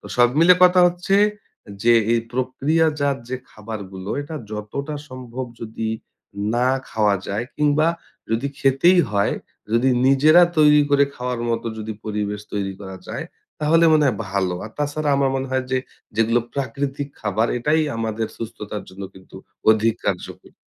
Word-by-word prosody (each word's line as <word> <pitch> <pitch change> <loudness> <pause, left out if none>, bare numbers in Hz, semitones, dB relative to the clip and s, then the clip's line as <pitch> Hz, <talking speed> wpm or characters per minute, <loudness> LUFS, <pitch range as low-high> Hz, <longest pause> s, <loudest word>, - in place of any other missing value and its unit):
তো - - -12
সব 120 0 +6
মিলে 180 +2 +7
কথা 180 0 +5
হচ্ছে 180 +2 +1 0.7
যে, 120 - +5 0.2
এই 115 - +3
প্রক্রিয়াজাত 145 +3 +1
যে 130 - -2
খাবারগুলো, 100 -3 -7
এটা 145 +3 -8 0.2
যতটা 110 +8 -5
সম্ভব 130 0 -6 0.2
যদি 110 0 -4 0.7
না 125 +2 +2 0.2
খাওয়া 105 -2 +2
যায়, 105 +4 -2
কিংবা 150 +2 +3 0.4
যদি 115 +5 0
খেতেই 135 +7 +4
হয়, 100 -1 +1 0.4
যদি 120 +3 +3 0.2
নিজেরা 155 +6 +6 0.2
তৈরি 150 -1 +6
করে 140 0 +5
খাওয়ার 125 -1 -3
মত 115 - -1 0.2
যদি 110 0 -4
পরিবেশ 105 -1 -3
তৈরি 100 -1 -2
করা 95 -1 -8
যায়, - - -4 0.4
তাহলে 165 +2 +4
মনে 155 -1 +4
হয় 120 - +1
ভালো। 95 -2 0
আর 110 - -8
তাছাড়া 150 +1 -1
আমার 135 -1 +2
মনে 135 0 -4
হয় 130 0 0
যে, 130 - +2 0.4
যেগুলো 115 +2 +3
প্রাকৃতিক 140 +1 -3
খাবার 105 +2 0
এটাই 155 +6 +2
আমাদের 110 0 -2
সুস্থতার 105 -2 -6
জন্য 95 +1 -10
কিন্তু 95 0 -15 0.3
অধিক 110 +1 +3
কার্যকরী। 90 -3 -4
125 Hz, 150 wpm, -22 LUFS, 110-145 Hz, 0.7 s, মিলে